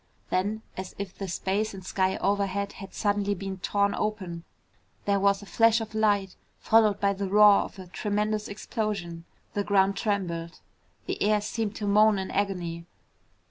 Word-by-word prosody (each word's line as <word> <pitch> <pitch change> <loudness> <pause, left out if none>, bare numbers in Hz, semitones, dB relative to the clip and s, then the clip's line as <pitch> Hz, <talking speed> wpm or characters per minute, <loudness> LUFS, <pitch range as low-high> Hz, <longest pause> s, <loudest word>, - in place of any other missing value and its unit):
Then, 205 +4 0
as 190 0 -6
if 200 -2 -6
the 195 - -5
space 195 +4 -1
and 190 -1 -10
sky 190 0 0
overhead 200 0 0
had 195 -4 -10
suddenly 205 -1 0
been 195 0 -6
torn 200 +2 +1
open, 185 -6 -3 0.6
there 200 -1 +2
was 200 +1 +2
a - - -10
flash 225 +4 +4
of 220 -1 -6
light 205 -3 +1 0.2
followed 215 -2 +3
by 200 0 +2
the 195 0 -3
roar 210 0 +7
of - - -7
a 190 - -8
tremendous 210 +3 -1
explosion. 200 -5 -4 0.3
The 205 - 0
ground 195 -1 +3
trembled. 175 -5 -2 0.5
The - - -4
air 210 +1 +3
seemed 210 0 -3
to 210 - -4
moan 210 +1 +5
in 190 0 -4
agony. 175 -4 -2
200 Hz, 165 wpm, -27 LUFS, 190-210 Hz, 0.6 s, roar